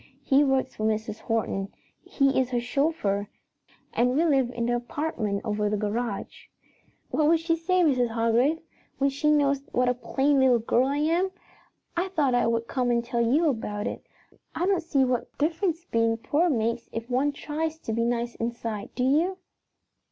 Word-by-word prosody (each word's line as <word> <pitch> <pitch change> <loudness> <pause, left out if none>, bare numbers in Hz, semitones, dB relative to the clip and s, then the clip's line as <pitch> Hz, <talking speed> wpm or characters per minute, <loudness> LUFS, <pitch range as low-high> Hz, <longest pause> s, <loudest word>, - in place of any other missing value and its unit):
He 275 +2 +4
works 270 -2 +1
for 215 - -6
Mrs. 215 0 -1
Horton; 210 -4 -2 0.3
he 275 -2 +1
is 255 -1 0
her 245 -1 0
chauffeur, 240 -6 0 0.7
and 245 +1 +2
we 320 +4 +3
live 270 -6 +3
in 235 -1 -3
the 240 +1 +1
apartment 240 -5 -2
over 210 -1 0
the 210 - 0
garage. 210 +1 -3 0.6
"What 300 - +2
will 335 - +5
she 330 +1 0
say, 360 +3 +1
Mrs. 255 -6 +3
Hargrave, 230 +6 +2 0.4
when 275 0 +2
she 280 +2 0
knows 280 -2 +3
what 250 0 +2
a - - +3
plain 270 +3 +1
little 260 -2 +5
girl 235 +3 +1
I 280 +1 -1
am? 335 +5 +1 0.7
I 350 +2 0
thought 305 -9 +1
I 245 -1 +3
would 230 0 0
come 250 -1 -1
and 235 -1 +1
tell 235 0 -1
you 280 +8 +3
about 210 -6 -2
it. - - -4 0.5
I 355 - 0
don't 380 -2 +2
see 290 -5 +2
what 250 -2 -2
difference 335 +2 -1
being 230 -3 +1
poor 305 +9 +1
makes 230 -3 -1
if 225 +1 -5
one 260 +4 +1
tries 315 +2 -3
to 225 - -4
be 230 +1 0
nice 235 0 -1
inside, 230 -3 -4
do 250 - -1
you?" 320 +8 +2
250 Hz, 180 wpm, -26 LUFS, 230-300 Hz, 0.7 s, will